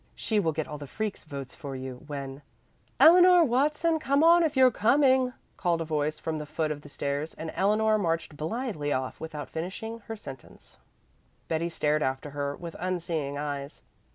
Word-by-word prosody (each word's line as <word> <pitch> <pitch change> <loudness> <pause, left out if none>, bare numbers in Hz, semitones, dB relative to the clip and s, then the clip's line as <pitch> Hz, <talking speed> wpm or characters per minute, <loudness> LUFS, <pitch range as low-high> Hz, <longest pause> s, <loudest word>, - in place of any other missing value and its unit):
She 215 -2 0
will 165 -5 +1
get 155 0 -3
all 150 -2 -7
the 145 - -8
freaks' 215 +6 -4
votes 140 -4 -7
for 140 -2 -7
you, 130 -1 -7
when 140 -1 -6 0.3
" - - -38
"Eleanor 355 +1 +8
Watson, 300 +5 +2
come 280 0 +2
on 340 +1 +7
if 310 -4 0
you're 260 -1 +7
coming," 260 +3 +3 0.3
called 175 -3 +1
a 165 - -2
voice 155 -1 -1
from 155 0 -3
the 150 - -6
foot 155 0 -1
of 145 -1 -5
the 145 - -13
stairs, 145 +2 -3
and 160 0 -6
Eleanor 215 +2 +2
marched 165 -4 -1
blithely 160 - -3
off, 130 -2 -2
without 155 -2 -6
finishing 195 +7 -5
her 225 - -4
sentence. 135 - -12 0.7
Betty 165 +1 -1
stared 150 -2 0
after 130 +2 -2
her 140 0 -3
with 170 -1 -8
unseeing 165 -6 -2
eyes. 145 -1 -5
160 Hz, 180 wpm, -28 LUFS, 145-225 Hz, 0.7 s, Eleanor